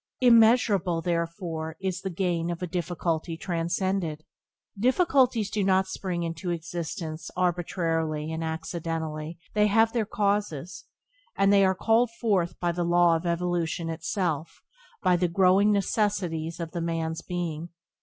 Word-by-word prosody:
Immeasurable, 225 Hz, -7 st, +4 dB
therefore, 170 Hz, -2 st, -3 dB
is 185 Hz, -2 st, -3 dB
the 190 Hz, -, -3 dB
gain 175 Hz, -2 st, -1 dB
of 175 Hz, +1 st, -4 dB
a -, -, +1 dB
difficulty 170 Hz, -1 st, -2 dB
transcended. 170 Hz, -1 st, -2 dB, 0.5 s
Difficulties 250 Hz, -, +2 dB
do 210 Hz, -2 st, 0 dB
not 190 Hz, 0 st, +3 dB
spring 185 Hz, -2 st, -3 dB
into 165 Hz, +2 st, -4 dB
existence 165 Hz, -1 st, -4 dB
arbitrarily 165 Hz, -3 st, -1 dB
and 160 Hz, 0 st, -3 dB
accidentally; 160 Hz, -1 st, -4 dB, 0.2 s
they 210 Hz, 0 st, +4 dB
have 225 Hz, +2 st, +3 dB
their 225 Hz, -4 st, 0 dB
causes, 200 Hz, -7 st, -1 dB, 0.5 s
and 195 Hz, 0 st, +4 dB
are 195 Hz, -1 st, +4 dB
called 225 Hz, +5 st, +3 dB
forth 185 Hz, -7 st, 0 dB
by 175 Hz, -1 st, +1 dB
the 175 Hz, +1 st, -2 dB
law 175 Hz, 0 st, +4 dB
of 165 Hz, +2 st, -2 dB
evolution 170 Hz, -1 st, -1 dB
itself, 165 Hz, -1 st, -3 dB, 0.4 s
by 180 Hz, -, +4 dB
the 175 Hz, 0 st, +1 dB
growing 190 Hz, +4 st, +4 dB
necessities 185 Hz, -5 st, 0 dB
of 165 Hz, -1 st, -4 dB
the 170 Hz, -, -3 dB
man's 165 Hz, -1 st, -2 dB
being. 170 Hz, -2 st, -4 dB
175 Hz, 135 wpm, -27 LUFS, 165-195 Hz, 0.5 s, Immeasurable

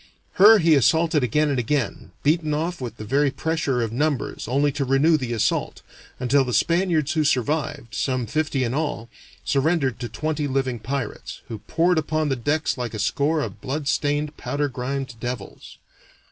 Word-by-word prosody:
Her 220 Hz, +2 st, +10 dB
he 165 Hz, -4 st, +4 dB
assaulted 160 Hz, +3 st, +3 dB
again 150 Hz, +5 st, +2 dB
and 135 Hz, -3 st, 0 dB
again, 125 Hz, -1 st, -2 dB
beaten 155 Hz, 0 st, +2 dB
off 165 Hz, +1 st, -3 dB
with 120 Hz, -2 st, -6 dB
the 110 Hz, -, -7 dB
very 140 Hz, +5 st, +2 dB
pressure 140 Hz, -4 st, -1 dB
of 115 Hz, -, -3 dB
numbers 145 Hz, -3 st, -1 dB
only 140 Hz, +4 st, +2 dB
to 140 Hz, 0 st, -2 dB
renew 135 Hz, +5 st, +3 dB
the 130 Hz, -5 st, -2 dB
assault, 110 Hz, -2 st, -1 dB, 0.4 s
until 135 Hz, +2 st, +3 dB
the 125 Hz, -3 st, -2 dB
Spaniards 165 Hz, -, +2 dB
who 155 Hz, -2 st, +1 dB
survived, 145 Hz, -2 st, -1 dB
some 125 Hz, +3 st, -1 dB
fifty 150 Hz, 0 st, -1 dB
in 120 Hz, 0 st, -1 dB
all, 145 Hz, -6 st, -2 dB, 0.4 s
surrendered 140 Hz, -3 st, +1 dB
to 120 Hz, -, -4 dB
twenty 155 Hz, -1 st, -2 dB
living 130 Hz, -3 st, -1 dB
pirates, 130 Hz, 0 st, -5 dB
who 110 Hz, -, -5 dB
poured 165 Hz, -, +1 dB
upon 155 Hz, 0 st, -1 dB
their 135 Hz, -, +1 dB
decks 145 Hz, +1 st, -1 dB
like 120 Hz, -2 st, -4 dB
a -, -, -3 dB
score 145 Hz, +9 st, +1 dB
of -, -, -6 dB
blood 140 Hz, +2 st, -3 dB
stained, 145 Hz, +1 st, 0 dB
powder 140 Hz, +4 st, -1 dB
grimed 130 Hz, 0 st, -4 dB
devils. 120 Hz, -4 st, -7 dB
140 Hz, 175 wpm, -23 LUFS, 125-155 Hz, 0.4 s, Her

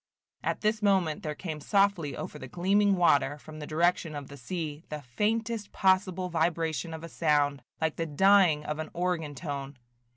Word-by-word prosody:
At -, -, -1 dB
this 215 Hz, 0 st, +1 dB
moment 190 Hz, -7 st, +2 dB
there 150 Hz, -1 st, -4 dB
came 155 Hz, -2 st, -6 dB
softly 195 Hz, -4 st, +1 dB
over -, -, -6 dB
the 130 Hz, -, -7 dB
gleaming 195 Hz, +6 st, +2 dB
water, 145 Hz, -5 st, +3 dB
from 155 Hz, +1 st, -11 dB
the 150 Hz, -, -6 dB
direction 165 Hz, 0 st, +1 dB
of 145 Hz, -2 st, -7 dB
the 140 Hz, -, -9 dB
sea, 150 Hz, +2 st, -5 dB
the 150 Hz, -1 st, -6 dB
faintest 215 Hz, -, -1 dB
possible 185 Hz, -1 st, +2 dB
vibration 165 Hz, -1 st, -1 dB
of 160 Hz, -, -9 dB
a -, -, -5 dB
sound, 145 Hz, -4 st, +1 dB, 0.2 s
like 160 Hz, -1 st, -1 dB
the 165 Hz, -, -2 dB
dying 175 Hz, -1 st, +4 dB
of 150 Hz, +1 st, -3 dB
an 155 Hz, -, -4 dB
organ 170 Hz, -4 st, -1 dB
tone. 140 Hz, -3 st, -5 dB
165 Hz, 175 wpm, -29 LUFS, 150-185 Hz, 0.2 s, dying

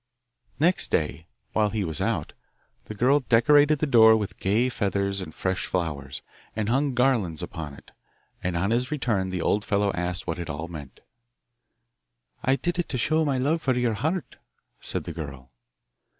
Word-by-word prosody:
Next 175 Hz, +5 st, +3 dB
day, 80 Hz, +1 st, -1 dB, 0.3 s
while 105 Hz, -1 st, +2 dB
he 105 Hz, -1 st, -1 dB
was 80 Hz, -4 st, -2 dB
out, -, -, -1 dB, 0.5 s
the 110 Hz, -, -7 dB
girl 130 Hz, +7 st, +4 dB
decorated 145 Hz, +5 st, +4 dB
the 155 Hz, -, 0 dB
door 110 Hz, -5 st, +7 dB
with 105 Hz, -2 st, -5 dB
gay 110 Hz, +6 st, +2 dB
feathers 100 Hz, -4 st, -1 dB
and 90 Hz, -, -7 dB
fresh 95 Hz, +3 st, -2 dB
flowers, 70 Hz, -7 st, -3 dB, 0.3 s
and 110 Hz, -1 st, -1 dB
hung 135 Hz, +2 st, +1 dB
garlands 120 Hz, -, +1 dB
upon 75 Hz, -3 st, -6 dB
it. -, -, -17 dB, 0.5 s
And 90 Hz, -1 st, -1 dB
on 95 Hz, +5 st, 0 dB
his 125 Hz, +2 st, +1 dB
return 115 Hz, -10 st, 0 dB
the 90 Hz, -2 st, -2 dB
old 105 Hz, -, +1 dB
fellow 100 Hz, -1 st, +1 dB
asked 90 Hz, +2 st, -2 dB
what 85 Hz, 0 st, -3 dB
it 85 Hz, -, -5 dB
all 75 Hz, +3 st, -4 dB
meant. 75 Hz, -6 st, -10 dB, 1.4 s
'I 130 Hz, +2 st, +3 dB
did 175 Hz, +4 st, -2 dB
it 175 Hz, -, -1 dB
to 130 Hz, -, -1 dB
show 155 Hz, +6 st, +2 dB
my 140 Hz, -3 st, +1 dB
love 150 Hz, +6 st, +1 dB
for 130 Hz, -3 st, +1 dB
your 120 Hz, -2 st, +1 dB
heart,' 160 Hz, -, -2 dB, 0.4 s
said -, -, -2 dB
the -, -, -6 dB
girl. 70 Hz, -6 st, -8 dB
105 Hz, 175 wpm, -26 LUFS, 90-130 Hz, 1.4 s, door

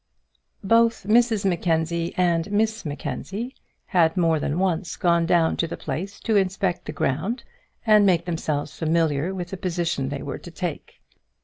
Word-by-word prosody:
Both 230 Hz, +2 st, +3 dB
Mrs 220 Hz, 0 st, +3 dB
Mackenzie 170 Hz, -2 st, 0 dB
and 175 Hz, 0 st, +1 dB
Miss 220 Hz, 0 st, 0 dB
Mackenzie 185 Hz, -, -5 dB, 0.3 s
had 170 Hz, -2 st, +2 dB
more 165 Hz, -3 st, +3 dB
than 145 Hz, +2 st, -1 dB
once 180 Hz, -2 st, 0 dB
gone 170 Hz, -1 st, +2 dB
down 170 Hz, -2 st, +3 dB
to 165 Hz, -, 0 dB
the -, -, -6 dB
place 195 Hz, +4 st, -5 dB
to 225 Hz, -, 0 dB
inspect 190 Hz, -2 st, 0 dB
the -, -, -4 dB
ground 170 Hz, -, -1 dB, 0.4 s
and 215 Hz, -2 st, +6 dB
make 175 Hz, -4 st, +3 dB
themselves 155 Hz, -4 st, -2 dB
familiar 160 Hz, 0 st, +1 dB
with 180 Hz, -2 st, -5 dB
the 190 Hz, -, -4 dB
position 170 Hz, -7 st, -1 dB
they 140 Hz, -1 st, -4 dB
were 140 Hz, -, -5 dB
to -, -, -10 dB
take. 170 Hz, -1 st, -6 dB
175 Hz, 155 wpm, -24 LUFS, 160-195 Hz, 0.4 s, and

